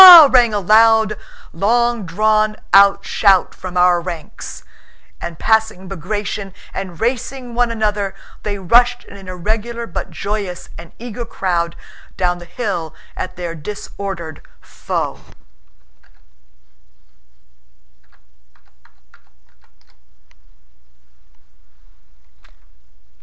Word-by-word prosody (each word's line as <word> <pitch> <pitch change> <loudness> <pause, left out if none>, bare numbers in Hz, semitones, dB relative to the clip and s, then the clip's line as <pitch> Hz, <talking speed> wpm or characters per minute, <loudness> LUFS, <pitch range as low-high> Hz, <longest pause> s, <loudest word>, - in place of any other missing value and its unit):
rang 290 -10 +11
a 210 - 0 1.0
long 235 +3 +1
drawn 215 +4 +2 0.5
shout 195 -3 +3
from 185 -1 -7
our 180 -1 +4
ranks, 170 -3 -7 0.6
and 170 -2 -6
passing 220 -1 +1
Bagratión 195 +2 -4 0.2
and 185 -4 -6
racing 250 +1 -2
one 240 0 +2
another 210 -3 -1 0.3
they 205 -1 -3
rushed 240 +6 +3
in - - -13
an 195 -1 -12
irregular 220 +6 -3
but 185 - -5
joyous 200 -3 -4
and 170 0 -11
eager 240 0 -6
crowd 175 -6 -2 0.4
down 180 -1 0
the 175 - -10
hill 175 -7 -4 0.2
at 185 - -5
their 175 -2 -5
disordered 170 -1 -6 0.2
foe. - - -4
200 Hz, 85 wpm, -18 LUFS, 180-230 Hz, 1.0 s, rang